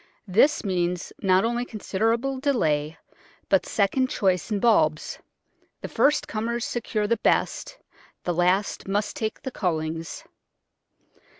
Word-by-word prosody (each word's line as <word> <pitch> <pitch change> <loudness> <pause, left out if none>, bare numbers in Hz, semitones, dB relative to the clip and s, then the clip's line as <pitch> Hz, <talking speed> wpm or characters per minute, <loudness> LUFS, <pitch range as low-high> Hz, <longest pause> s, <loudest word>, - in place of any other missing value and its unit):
This 235 +11 +4
means 180 -2 -1
not 190 0 +3
only 240 +1 0
considerable 230 +4 -1
delay, 160 - 0 0.5
but 195 - +3
second 255 +6 +1
choice 185 -4 0
in 210 -2 0
bulbs; 160 -9 +2 0.6
the - - -4
first 295 - +2
comers 230 +2 -2
secure 215 -3 -2
the 230 +3 +1
best, - - 0 0.5
the 175 - -1
last 180 +5 +1
must 205 +2 -1
take 220 -1 -4
the 265 - -4
cullings. 165 -5 -3
205 Hz, 120 wpm, -25 LUFS, 180-235 Hz, 0.6 s, This